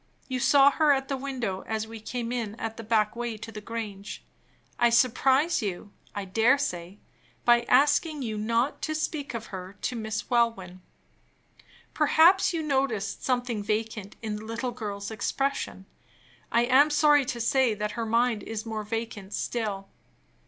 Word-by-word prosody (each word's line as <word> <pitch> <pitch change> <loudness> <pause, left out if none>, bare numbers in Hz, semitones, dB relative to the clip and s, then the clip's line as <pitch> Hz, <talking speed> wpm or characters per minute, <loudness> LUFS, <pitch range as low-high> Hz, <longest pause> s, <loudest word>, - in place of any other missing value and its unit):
You 255 -1 -2
saw 275 +2 +6
her 305 0 +3
at 270 0 -2
the 275 - 0
window 255 -8 -3
as 220 0 -2
we 225 0 -9
came 235 +2 -4
in 230 -4 -3
at 225 -1 -5
the 230 - -7
back 215 -1 +1
way 235 -2 -3
to 225 +1 -8
the 215 -1 -8
Grange. 210 -2 -6 0.6
I 240 0 +5
surprised 265 +6 +3
you, 200 0 -4 0.2
I 200 -1 -3
dare 225 +8 +3
say, 180 -8 -4 0.5
by 240 0 +6
asking 295 +1 +3
you 220 -3 -3
not 230 +5 0
to 310 - -2
speak 300 -4 -3
of 225 -1 -6
her 190 +1 -7
to 250 - -1
Miss 220 -1 -4
Welwyn. 225 -7 0 1.1
Perhaps 325 +6 +5
you 330 -2 -2
noticed 265 -9 -1
something 245 -4 -1
vacant 215 -1 -3
in 215 -1 -3
the 215 - -9
little 235 +3 -3
girl's 205 -3 -5
expression. 245 -2 -2 0.7
I 235 +1 +3
am 265 +4 +5
sorry 295 -1 +5
to 245 -1 -4
say 235 0 +2
that 210 +1 -3
her 230 -1 -3
mind 230 -1 +2
is 220 +2 -5
more 220 -1 -4
vacant 220 -2 -5
still. 205 -5 -3
230 Hz, 165 wpm, -27 LUFS, 210-265 Hz, 1.1 s, saw